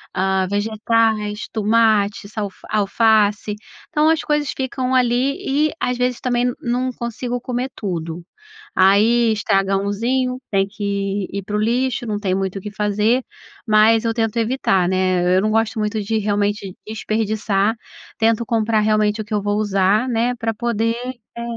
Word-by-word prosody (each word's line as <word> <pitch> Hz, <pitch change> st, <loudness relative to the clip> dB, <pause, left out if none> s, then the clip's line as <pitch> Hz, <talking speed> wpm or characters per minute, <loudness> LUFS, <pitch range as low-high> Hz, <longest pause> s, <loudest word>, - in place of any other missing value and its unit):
Hã, 190 Hz, 0 st, +1 dB
vegetais, 215 Hz, 0 st, 0 dB
tomate, 215 Hz, -2 st, +2 dB
salf 205 Hz, -3 st, -5 dB
alface 210 Hz, 0 st, +2 dB, 0.3 s
então, 305 Hz, -1 st, +3 dB
as 320 Hz, -1 st, +2 dB
coisas 295 Hz, -2 st, -1 dB
ficam 260 Hz, -1 st, -2 dB
ali 250 Hz, +2 st, +2 dB, 0.3 s
e, -, -, -5 dB
às 250 Hz, 0 st, 0 dB
vezes, 250 Hz, 0 st, -1 dB
também 245 Hz, -1 st, +1 dB
n 245 Hz, -, 0 dB
não 250 Hz, +2 st, -1 dB
consigo 240 Hz, +1 st, -4 dB
comer 250 Hz, +1 st, -3 dB
tudo. 170 Hz, -4 st, -4 dB, 0.5 s
Aí, 220 Hz, +5 st, +4 dB
estraga 195 Hz, -2 st, +1 dB
unzinho, 245 Hz, +6 st, -1 dB
tem 195 Hz, -1 st, +2 dB
que 200 Hz, -1 st, -3 dB
ir 200 Hz, 0 st, -4 dB
pro 210 Hz, +1 st, -3 dB
lixo, 245 Hz, +3 st, 0 dB
não 210 Hz, -2 st, -2 dB
tem 195 Hz, -3 st, -1 dB
muito 195 Hz, 0 st, -2 dB
o -, -, -13 dB
que 210 Hz, -, -7 dB
fazer, 210 Hz, +4 st, +1 dB, 0.5 s
mas 220 Hz, +2 st, +4 dB
eu 225 Hz, -, +1 dB
tento 225 Hz, 0 st, -1 dB
evitar, 220 Hz, -6 st, +1 dB
né, 185 Hz, -1 st, +1 dB
e 180 Hz, +1 st, +3 dB
eu -, -, +3 dB
não 215 Hz, +1 st, 0 dB
gosto 225 Hz, +1 st, +1 dB
muito 210 Hz, +1 st, -1 dB
de 220 Hz, +2 st, -1 dB
realmente 205 Hz, -2 st, -1 dB
desperdiçar, 215 Hz, -1 st, 0 dB, 0.4 s
tento 225 Hz, 0 st, +2 dB
comprar 225 Hz, -1 st, +1 dB
realmente 215 Hz, 0 st, +2 dB
o -, -, -7 dB
que 210 Hz, -, -7 dB
eu 210 Hz, -, +1 dB
vou 205 Hz, +1 st, -1 dB
usar, 205 Hz, +2 st, +2 dB
né, 240 Hz, +1 st, +1 dB
pra 225 Hz, -1 st, -2 dB
poder, 230 Hz, 0 st, -1 dB, 0.4 s
eh, 235 Hz, -, -4 dB
215 Hz, 160 wpm, -20 LUFS, 200-235 Hz, 0.5 s, Aí